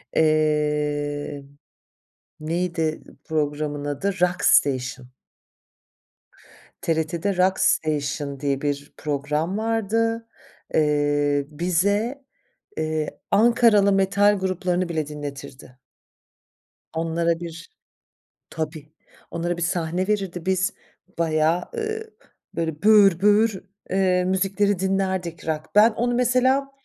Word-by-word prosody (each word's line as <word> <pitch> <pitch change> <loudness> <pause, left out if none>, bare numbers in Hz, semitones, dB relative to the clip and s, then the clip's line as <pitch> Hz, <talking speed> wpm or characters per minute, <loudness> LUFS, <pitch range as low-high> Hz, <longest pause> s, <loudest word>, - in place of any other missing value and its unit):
Eee, 150 -2 0 1.0
neydi 165 0 -2 0.3
programın 145 -1 -2
adı? 145 +6 -2
Rock 180 0 +1
Station. 130 -2 +2 1.7
TRT'de 165 +4 -1
Rock 185 +1 +2
Station 145 -5 0
diye 140 -1 -1
bir 145 -1 -3
program 150 +5 -2
vardı. 225 +1 0 0.5
Eee, 145 -1 +2
bize, 200 - 0 0.5
eee, 155 -1 -2
Ankaralı 220 -2 +5
metal 200 +1 +3
gruplarını 185 -1 -1
bile 155 -3 -2
dinletirdi. 140 -3 -9 1.2
Onlara 165 +1 0
bir 165 -1 -9 0.7
Tabii, 155 -1 -6 0.4
onlara 170 +1 -2
bir 175 - -5
sahne 175 +1 -1
verirdi 195 -5 -2
biz 190 0 +1 0.5
bayağı, 160 +1 +2
ııı, 440 0 -4 0.4
böyle, 160 0 -3
böğür 200 -5 +6
böğür, 210 0 +3 0.3
eee, 185 -1 +2
müzikleri 195 +1 +1
dinlerdik 190 -3 -2
rock. 155 -1 -1
Ben 215 +3 +7
onu 240 +2 -1
mesela 255 +3 +2
170 Hz, 90 wpm, -23 LUFS, 150-200 Hz, 1.7 s, Ben